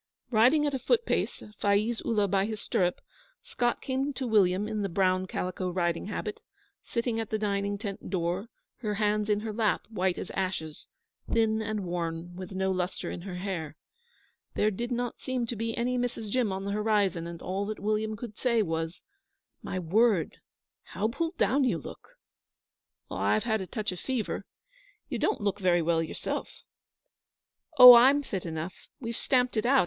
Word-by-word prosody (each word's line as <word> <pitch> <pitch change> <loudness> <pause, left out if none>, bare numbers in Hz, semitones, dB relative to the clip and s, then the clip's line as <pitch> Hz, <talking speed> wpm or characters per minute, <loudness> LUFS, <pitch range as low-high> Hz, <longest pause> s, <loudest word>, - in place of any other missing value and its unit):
Riding 255 +7 +5
at 290 - 0
a 265 - -1
foot 470 - +2
pace, - - -1 0.2
Faiz 210 +3 +1
Ullah 210 -3 +1
by 195 +1 +1
his 220 -1 -4
stirrup, 180 -3 0 0.4
Scott 245 - -1
came 270 +2 -1
to 265 - -3
William 205 -3 +3
in 215 -1 -2
the 200 - -1
brown 185 +1 +1
calico 185 0 -3
riding 175 -1 -1
habit, 210 0 -4 0.4
sitting 235 -1 -1
at 225 - -3
the 215 - 0
dining 200 -1 -1
tent 200 -2 -6
door, 180 +3 -1 0.3
her 210 -4 -2
hands 210 0 +1
in 210 0 +2
her 220 -1 -4
lap, 215 -1 +1
white 185 -4 0
as - - -5
ashes, 180 -5 -3 0.4
thin 220 -1 +2
and 215 -1 -2
worn, 170 0 -4
with 185 +1 -7
no 190 0 0
lustre 185 0 -2
in - - -6
her 180 0 -6
hair. 175 -5 -4 0.8
There 215 - +2
did 235 +5 -4
not 245 0 -2
seem 255 -2 -1
to 235 - -4
be 225 +1 -3
any 250 +1 0
Mrs. 230 -4 -3
Jim 245 -4 +1
on 190 +1 -4
the 200 - -2
horizon, 205 -5 +1
and 170 -1 -7
all 195 +3 -3
that 215 - -4
William 215 +1 -1
could 220 -2 -8
say 235 -3 +2
was: 165 -1 -3 0.6
'My - - -4
word, 185 0 +2 0.4
how 215 +3 -2
pulled 330 +8 -3
down 250 +7 +3
you 255 - +2
look!' - - -11 0.9
'I've 215 - +1
had 220 -3 0
a 190 - -5
touch 215 0 -3
of 180 - -7
fever. 255 -5 -3 0.6
You - - -2
don't 420 - 0
look 205 0 -1
very 175 -3 +3
well 165 0 +2
yourself.' 160 - -4 1.1
'Oh, 250 -1 +13
I'm 265 +5 +6
fit 190 -9 -4
enough. 160 +2 -4 0.3
We've 235 -2 -4
stamped 250 0 +1
it 215 - +2
out. 270 +1 +5
210 Hz, 180 wpm, -29 LUFS, 185-235 Hz, 1.1 s, Oh